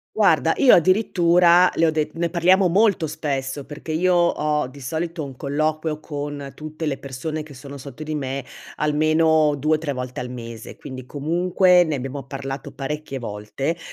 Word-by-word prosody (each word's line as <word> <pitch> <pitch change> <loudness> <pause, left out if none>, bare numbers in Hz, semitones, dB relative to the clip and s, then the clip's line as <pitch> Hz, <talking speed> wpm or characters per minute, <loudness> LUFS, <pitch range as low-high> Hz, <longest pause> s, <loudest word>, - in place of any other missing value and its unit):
Guarda - - +4
io 270 -4 +6
addirittura 180 -1 +5
le 165 - +3
ho 160 - +3
det 155 -1 -1
ne 170 0 -1
parliamo 185 +2 +4
molto 200 -1 +3
spesso, 140 -2 -3
perché 150 +2 -8
io 180 +3 +2
ho 150 -4 +1
di 140 +2 -13
solito 160 +4 -3
un 135 -2 -8
colloquio 155 +3 -1
con 145 -2 -6
tutte 155 +1 -6
le 135 - -1
persone 150 +4 -5
che 150 - -13
sono 140 +2 -10
sotto 140 +1 -10
di 155 0 -3
me, 135 -2 -3 0.3
almeno 155 0 +3
2-3 155 0 0
volte 125 0 -5
al 125 0 -5
mese; 115 -2 -8
quindi 130 -2 -9
comunque 175 +5 +3
ne 155 -3 -2
abbiamo 135 +1 -5
parlato 135 0 -6
parecchie 140 +1 -5
volte 115 +8 -4
150 Hz, 165 wpm, -22 LUFS, 135-165 Hz, 0.3 s, io